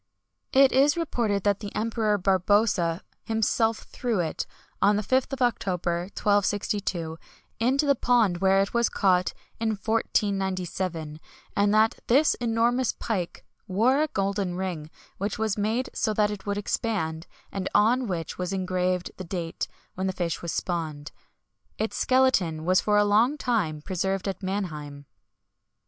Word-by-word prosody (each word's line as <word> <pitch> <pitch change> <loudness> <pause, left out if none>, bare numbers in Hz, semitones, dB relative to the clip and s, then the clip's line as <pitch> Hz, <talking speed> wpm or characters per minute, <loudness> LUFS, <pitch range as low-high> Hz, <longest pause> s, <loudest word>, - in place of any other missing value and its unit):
It 270 0 +6
is 285 +4 +4
reported 230 - 0
that 205 -1 +2
the 205 -1 -6
Emperor 220 -1 +1
Barbarossa 190 -2 +2 0.2
himself 225 0 +1
threw 235 -6 -2
it, 160 -3 -2 0.3
on 205 +1 +5
the 210 - 0
5th 260 +6 +1
of 265 -1 -1
October, 180 -7 0
1262, 200 -5 0 0.4
into 265 +6 +2
the 280 - +5
pond 230 -9 +2
where 195 +1 +4
it 195 - -2
was 235 -1 +2
caught 185 -3 +2 0.3
in 225 0 0
1497; 190 -7 -1 0.4
and 200 0 +3
that 220 +1 +3
this 280 +6 +4
enormous 235 +2 +1
pike 185 -6 -4 0.2
wore 235 +9 +3
a 310 - +2
golden 195 -5 -1
ring, 175 -5 -4 0.3
which 200 +2 -2
was 220 -2 0
made 220 +5 -1
so 215 - 0
that 210 0 +2
it 205 -1 -7
would 200 0 -1
expand, 190 -6 -2 0.2
and 195 -1 -3
on 240 +4 +4
which 170 -4 -4
was 180 +1 -2
engraved 185 -1 -1
the 185 - -6
date 170 -2 -4 0.3
when 190 +1 -2
the 190 - -1
fish 175 -3 -2
was 170 - -3
spawned. 155 -4 -3 0.7
Its 220 - -2
skeleton 200 -12 +2
was 185 +1 +4
for 210 -1 +2
a 210 - +5
long 225 +8 +3
time 185 - -1
preserved 190 +2 -2
at 195 - -3
Mannheim. 155 -8 -4
200 Hz, 150 wpm, -26 LUFS, 180-225 Hz, 0.7 s, It